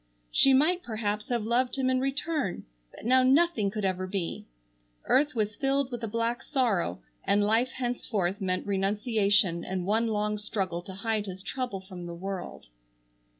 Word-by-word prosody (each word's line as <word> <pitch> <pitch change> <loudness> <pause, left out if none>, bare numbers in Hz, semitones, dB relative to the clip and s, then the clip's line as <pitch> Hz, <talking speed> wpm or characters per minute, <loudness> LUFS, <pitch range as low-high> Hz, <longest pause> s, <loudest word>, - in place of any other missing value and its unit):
She 270 - +6
might 315 +7 +4
perhaps 210 -6 -3
have 240 -3 0
loved 245 +3 +1
him 265 -2 0
in 255 0 +2
return, 275 - -2 0.2
but - - -13
now 255 +2 +5
nothing 265 -4 +3
could 210 0 -3
ever 185 0 -1
be! 185 -3 -4 0.6
Earth 290 0 +3
was 210 -2 -1
filled 270 +1 0
with 240 -1 -5
a - - -1
black 230 +2 -1
sorrow, 200 - 0 0.2
and 205 +1 +3
life 225 +5 +3
henceforth 220 -6 -2
meant 185 -1 -1
renunciation 200 -2 +2
and 185 -1 -3
one 220 +4 +2
long 210 -1 -1
struggle 190 -5 -2
to 190 +1 -9
hide 215 +1 -1
his 190 0 -7
trouble 245 -7 -3
from 185 -2 -9
the 170 - -6
world. 185 - -6
210 Hz, 165 wpm, -28 LUFS, 195-255 Hz, 0.6 s, She